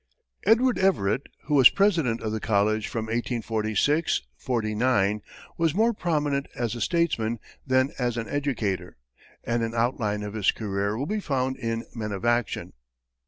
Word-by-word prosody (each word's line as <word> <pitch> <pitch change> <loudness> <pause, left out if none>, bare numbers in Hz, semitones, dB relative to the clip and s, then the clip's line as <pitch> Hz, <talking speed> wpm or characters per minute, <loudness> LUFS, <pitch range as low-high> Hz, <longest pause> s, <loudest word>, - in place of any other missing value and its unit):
Edward 245 +3 +4
Everett, 135 - +1 0.2
who 150 - -3
was 135 -4 +9
president 165 - +2
of 110 - -2
the 110 - -2
college 110 0 +1
from 115 -2 -3
1846 115 - 0
49, 110 -3 +1 0.4
was 165 -1 +2
more 225 +3 +3
prominent 150 -7 0
as 120 -2 -2
a 120 - -5
statesman 130 -10 +1 0.3
than 130 +1 +3
as 120 -2 0
an 115 -1 -3
educator, 125 -10 -2 0.5
and 120 0 0
an 115 0 -2
outline 115 -3 0
of 105 0 -5
his 105 -3 +2
career 100 0 -2
will 135 - -2
be 210 +6 -1
found 130 -7 -1
in 115 -2 -3
"Men 110 -3 -4
of 100 +3 -5
Action." 120 -3 0
120 Hz, 155 wpm, -26 LUFS, 110-145 Hz, 0.5 s, was